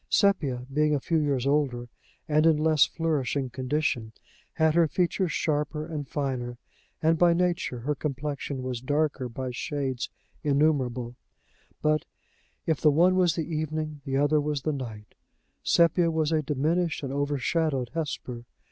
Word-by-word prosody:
Sepia, 145 - +2
being 150 +1 +3
a - - 0
few 160 +4 +1
years 140 -4 0
older, 135 -4 +1 0.4
and 155 +1 +4
in 160 -2 +5
less 155 -1 +4
flourishing 145 -5 -1
condition, 130 -4 -1 0.4
had 160 -1 +3
her 170 0 +4
features 180 +2 0
sharper 150 0 -1
and 155 -4 -5
finer, 130 -4 -3 0.5
and 160 0 +3
by 175 -1 +6
nature 175 -8 0
her 150 +5 0
complexion 140 -1 -4
was 125 -2 -3
darker 145 -1 0
by 130 +2 -4
shades 135 -1 -3 0.3
innumerable; 140 -5 +1 0.7
but, 155 -1 +2 0.6
if 160 -3 0
the 155 - +6
one 170 +5 +4
was 180 -3 +3
the 165 - -2
evening, 155 -1 -3
the 135 -1 -1
other 145 +2 +3
was 145 -2 -2
the 155 - 0
night: 110 -6 -7 0.5
Sepia 170 0 +4
was 160 -1 0
a 160 -1 +2
diminished 155 +4 0
and 135 -1 -3
overshadowed 145 -1 0
Hesper. 130 -7 -4
150 Hz, 145 wpm, -27 LUFS, 130-160 Hz, 0.7 s, by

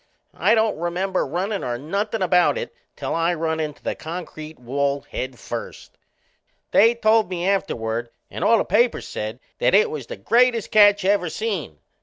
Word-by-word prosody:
I 225 - +3
don't 220 -6 +1
remember 180 +2 -1
runnin' 190 +7 -2
or 120 -1 -2
nothin' 200 - -2
about 180 - +3
it 485 -1 -5 0.2
till - - -4
I 165 +1 +1
run 160 0 -2
into 150 -2 -4
the - - -1
concrete 160 -2 -8
wall 140 +3 -1
head 130 -1 -6
first. - - -7 0.8
They 230 +3 +5
told 220 -3 +3
me 180 0 -2
afterward 120 - -1 0.2
and - - -4
all 230 - +5
the - - 0
papers 240 0 +1
said 110 +3 -5 0.2
that - - +3
it 210 - +4
was 140 -6 -6
the - - -7
greatest 235 - +2
catch 205 -2 +5
ever 195 -3 +2
seen. 190 - -4
180 Hz, 170 wpm, -22 LUFS, 150-215 Hz, 0.8 s, They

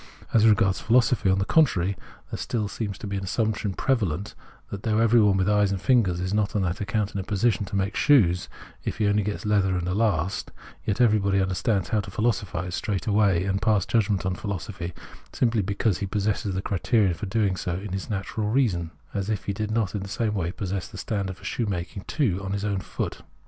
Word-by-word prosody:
A.S 110 -1 +5
regards 105 -3 +4
philosophy, 120 -3 +3
on 95 - +3
the 95 - 0
contrary, 100 - +3 0.4
there - - -4 0.3
seems - - -9 0.2
still 105 -5 -7
an 100 -1 -2
assumption 105 0 -1
prevalent 100 - 0 0.4
that, 100 - -5
though 110 -1 0
every 115 +1 +5
one 100 -2 +4
with 95 0 +1
eyes 105 -1 +3
and 100 - -1
fingers 100 -6 +2
is 90 +2 -2
not 105 -1 0
on 100 - +2
that 90 +1 -2
account 105 0 -1
in 100 - -2
a - - -2
position 105 +2 +1
to 100 - -6
make 100 +1 0
shoes 90 -12 +4 0.3
if - - -3
he 110 - +1
only 105 +1 +3
gets 105 +1 -4
leather 100 -3 +2
and 90 0 -2
a 90 - 0
last, 95 -4 0 0.4
yet 100 - 0
everybody 105 -5 +3
understands 95 +1 0
how 110 - +2
to 100 - -5
philosophise 95 -4 -1
straight 100 0 -2
away, 100 -5 +3
and 100 +1 -1
pass 110 -4 +2
judgment 105 -4 +1
on 95 - 0
philosophy, 90 -3 -5 0.4
simply 115 -3 +2
because 100 +1 0
he 100 - -2
possesses 100 -1 -1
the 95 - -2
criterion 100 0 +2
for 105 +4 -5
doing 100 -2 +1
so 90 -1 -3
in 95 +1 -5
his 95 -1 -4
natural 105 +1 -2
reason 105 -10 +1
— - - -32
as 100 0 -2
if 105 -3 -1
he 100 - -1
did 105 +2 -3
not 110 -3 0
in 105 - -2
the 100 - -6
same 110 +1 -1
way 90 -4 -1
possess 95 -1 -4
the - - -11
standard 100 -4 -3
for - - -18
shoemaking 95 -4 -3
too 115 - 0
in 95 0 -3
his 100 0 -2
own 100 -2 0
foot. - - -4
100 Hz, 215 wpm, -25 LUFS, 95-110 Hz, 0.4 s, A.S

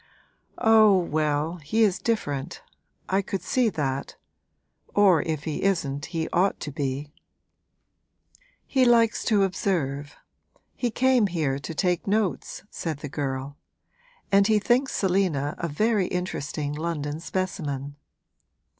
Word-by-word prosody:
'Oh, 220 -4 +6
well, 155 -1 0
he 180 +9 +1
is 195 -4 +2
different 150 - -2 0.4
I 190 +1 +2
could 190 -2 -4
see 250 +2 +2
that; 140 -6 -3 0.8
or 190 -6 +5
if 155 -3 -3
he 155 -2 -3
isn't 150 -8 0
he 165 -2 -2
ought 190 +3 +1
to 150 - -4
be!' 140 +1 -3 1.5
'He 265 -2 +2
likes 230 -2 +4
to 210 -3 +3
observe 145 -7 -1 0.6
he 245 - -1
came 250 -1 +3
here 155 -7 -1
to 160 +3 -7
take 180 +2 0
notes,' 205 -1 -1
said 155 -4 -4
the 145 - -5
girl. 135 0 -4 0.7
'And 200 0 +5
he 215 - +4
thinks 250 +6 +1
Selina 180 -7 +1
a 170 - -1
very 205 +5 +1
interesting 150 -5 -3
London 150 -1 -3
specimen.' 150 -7 -3
170 Hz, 125 wpm, -25 LUFS, 145-200 Hz, 1.5 s, Oh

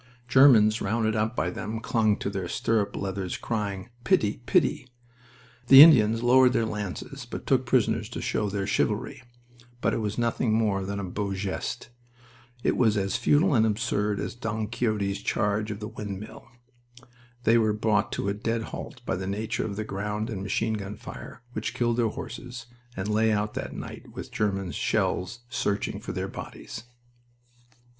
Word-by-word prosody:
Germans 120 -5 +6
rounded 110 -1 0
up 110 +2 0
by 90 - 0
them 110 +4 -4
clung 110 -2 +1
to 100 - -3
their 95 -3 -3
stirrup 100 +2 0
leathers 95 -2 -3
crying: 105 -2 -3
"Pity! 105 -1 +2
Pity!" 150 -7 +2 0.8
The 135 +2 +12
Indians 115 -7 +6
lowered 125 +1 +6
their 115 - +2
lances, 105 -4 -5
but - - -6
took - - +2
prisoners - - +1
to - - -6
show 105 - -1
their 100 0 -2
chivalry. 105 +4 -1 0.6
But - - +1
it - - 0
was 105 -1 -3
nothing 115 -1 +1
more 105 -4 +1
than 100 0 -3
a - - -3
beau 100 +1 -3
geste. 95 0 -4 0.7
It - - +1
was 110 -4 +3
as 100 -1 0
futile 150 +4 +3
and 110 -4 +4
absurd 105 -1 0
as - - -3
Don 110 -2 -3
Quixote's 110 -4 -1
charge 105 +1 0
of 105 -1 -5
the 105 - -5
windmill. 105 -2 -7 1.0
They 115 +1 +5
were 110 -1 +2
brought 105 0 +1
to - - -2
a 100 - +1
dead 115 +2 -2
halt - - -7
by - - -1
the 95 0 -4
nature 110 +4 -2
of 100 - -4
the 110 - -3
ground 105 +3 -3
and 100 -4 -4
machine 110 +3 -1
gun 105 -1 -5
fire 120 - -10
which 110 -1 -3
killed 120 -1 +1
their 120 -2 +3
horses, 125 +3 -7 0.3
and 95 +1 -3
lay 110 +1 +2
out 105 0 0
that - - -5
night - - -8
with - - -8
German 95 -3 -1
shells 120 +7 -1
searching 100 -4 -2
for - - -6
their - - -3
bodies. - - -8
110 Hz, 170 wpm, -27 LUFS, 100-115 Hz, 1.0 s, The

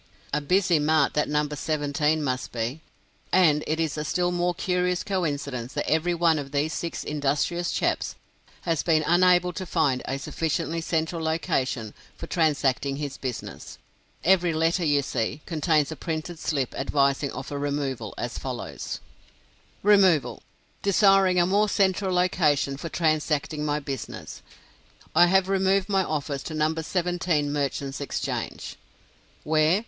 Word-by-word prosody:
A 150 - +1
busy 180 +1 +3
mart 150 -1 +2
that 150 - 0
No. 150 0 +1
17 150 +1 0
must 130 -2 -2
be! 120 +6 -3 0.5
And 155 -5 +4
it 160 +1 -1
is 160 -2 -1
a - - -2
still 175 +3 0
more 175 0 0
curious 180 0 0
coincidence 145 - -2
that 145 - -2
every 165 +3 +1
one 165 -2 +3
of 135 -1 -7
these 145 +3 0
six 170 - -4
industrious 150 +4 -1
chaps - - -1 0.5
has 165 -3 0
been 155 -2 +2
unable 180 +1 +4
to 185 - -4
find 145 -7 +1
a 135 - -2
sufficiently 160 +3 -2
central 165 +1 -1
location 135 - -1 0.2
for - - -6
transacting 140 -4 +1
his 145 -1 -4
business. 130 -3 -6 0.5
Every 180 -2 +4
letter 165 +3 +1
you 145 -3 +2
see, 130 +3 -2
contains 155 -2 +1
a - - -4
printed 160 +2 -4
slip 140 -7 -1
advising 140 0 +1
of - - -7
a 145 - -3
removal, 140 -6 -3
as - - -4
follows: - - -5 0.8
"REMOVAL. 190 -7 +4 0.4
Desiring 195 -2 +4
a 175 - +4
more 205 +3 +2
central 190 -1 +1
location 160 -6 +2
for 165 +4 -6
transacting 155 -2 0
my 150 0 0
business, 135 -5 -6 0.7
I 175 +2 +6
have 190 +1 +3
removed 195 0 +2
my 195 -1 +2
office 145 -4 -3
to 155 - -5
No. 155 +1 +1
17 165 -2 -1
Merchants 140 -1 -2
Exchange." 140 - -4 0.7
Where? 155 +4 +3
155 Hz, 145 wpm, -26 LUFS, 145-175 Hz, 0.8 s, I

